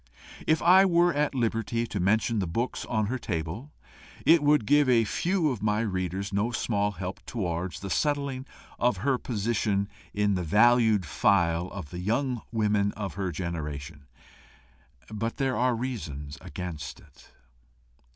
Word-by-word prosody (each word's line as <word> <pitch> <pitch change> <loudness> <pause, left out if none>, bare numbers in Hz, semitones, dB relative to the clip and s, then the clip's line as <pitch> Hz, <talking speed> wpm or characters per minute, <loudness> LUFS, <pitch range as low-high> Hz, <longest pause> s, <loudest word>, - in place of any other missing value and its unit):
If 155 0 +2
I 185 +3 +7
were 175 -2 +4
at 145 -1 0
liberty 115 -1 0
to 105 - -4
mention 110 +4 +2
the 95 - -1
books 115 +10 -2
on 110 -2 0
her 125 +5 -2
table, 85 - -4 0.5
it 165 0 +6
would 145 -5 +3
give 145 +3 +4
a 115 -2 +5
few 165 - 0
of 120 -6 -5
my 105 0 +1
readers 95 -1 -2
no 100 +4 +1
small 105 -3 0
help 90 +1 -6
towards 90 -5 -3
the 100 - -5
settling 140 -3 -1 0.3
of 120 -4 +2
her 135 -3 +2
position 105 -3 -1 0.2
in 105 0 +1
the 90 - -1
"valued 110 +2 +4
file" 85 +2 +2
of 90 -6 -8
the 90 - -6
young 120 +5 -1
women 105 -2 +1
of 100 -2 -5
her 95 -2 -2
generation; 75 -4 -5 1.1
but 115 +2 -3
there 135 -2 0
are 125 0 +2
reasons 80 - -5
against 80 -2 -6
it. - - -20
105 Hz, 150 wpm, -27 LUFS, 90-125 Hz, 1.1 s, I